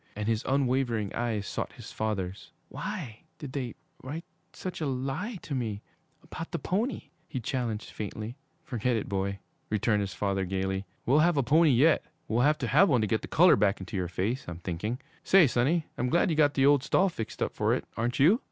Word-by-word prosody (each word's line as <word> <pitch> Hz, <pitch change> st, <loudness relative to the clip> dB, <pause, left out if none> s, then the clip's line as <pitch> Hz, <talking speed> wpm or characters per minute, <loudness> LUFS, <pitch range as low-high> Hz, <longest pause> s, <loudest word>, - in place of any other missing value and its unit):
And 105 Hz, 0 st, -3 dB
his 115 Hz, -1 st, +1 dB
unwavering 130 Hz, -6 st, +1 dB
eyes 115 Hz, -4 st, -1 dB
sought -, -, -4 dB
his -, -, -10 dB
father's. 100 Hz, -3 st, -3 dB, 0.2 s
'Why 110 Hz, -3 st, -5 dB, 0.2 s
did 140 Hz, -4 st, -8 dB
they 125 Hz, -5 st, -3 dB, 0.3 s
write 155 Hz, +6 st, -6 dB, 0.3 s
such 185 Hz, -2 st, -6 dB
a 155 Hz, -, 0 dB
lie 135 Hz, -, -2 dB
to 150 Hz, -, -5 dB
me 110 Hz, -6 st, -2 dB, 0.4 s
about 165 Hz, -, -7 dB
the -, -, -2 dB
pony?' 200 Hz, -, -2 dB, 0.2 s
he 130 Hz, -, -4 dB
challenged 115 Hz, -2 st, -3 dB
faintly. 110 Hz, +2 st, -5 dB, 0.3 s
'Forget 125 Hz, -3 st, -1 dB
it, 110 Hz, -, -2 dB
boy!' 100 Hz, 0 st, -1 dB, 0.3 s
returned 105 Hz, 0 st, +2 dB
his 100 Hz, -2 st, -4 dB
father 100 Hz, 0 st, 0 dB
gayly. 95 Hz, +1 st, -2 dB, 0.2 s
'We'll 140 Hz, +5 st, +4 dB
have 170 Hz, 0 st, +4 dB
a 140 Hz, -, +3 dB
pony 155 Hz, +6 st, +5 dB
yet! 145 Hz, +5 st, +4 dB, 0.2 s
We'll 115 Hz, +2 st, +1 dB
have 150 Hz, +3 st, +4 dB
to -, -, -2 dB
have 175 Hz, -, +5 dB
one 125 Hz, -6 st, +3 dB
to -, -, +2 dB
get 110 Hz, +1 st, 0 dB
the -, -, -7 dB
color 180 Hz, +3 st, +6 dB
back 100 Hz, -1 st, +2 dB
into 95 Hz, +2 st, -7 dB
your 90 Hz, -2 st, -1 dB
face, 100 Hz, +9 st, -2 dB
I'm 85 Hz, -1 st, -5 dB
thinking! 95 Hz, +8 st, -3 dB, 0.2 s
Say, 190 Hz, -3 st, +7 dB
sonny, 145 Hz, +6 st, +2 dB
I'm 125 Hz, -, +1 dB
glad 170 Hz, +4 st, +3 dB
you -, -, +1 dB
got 145 Hz, -2 st, +3 dB
the 135 Hz, -, +4 dB
old 145 Hz, -1 st, +6 dB
stall 190 Hz, +8 st, +3 dB
fixed 115 Hz, -, -5 dB
up -, -, -2 dB
for -, -, +1 dB
it, -, -, -4 dB
aren't 120 Hz, +1 st, -1 dB
you?' 175 Hz, -, +5 dB
120 Hz, 205 wpm, -29 LUFS, 105-150 Hz, 0.4 s, Say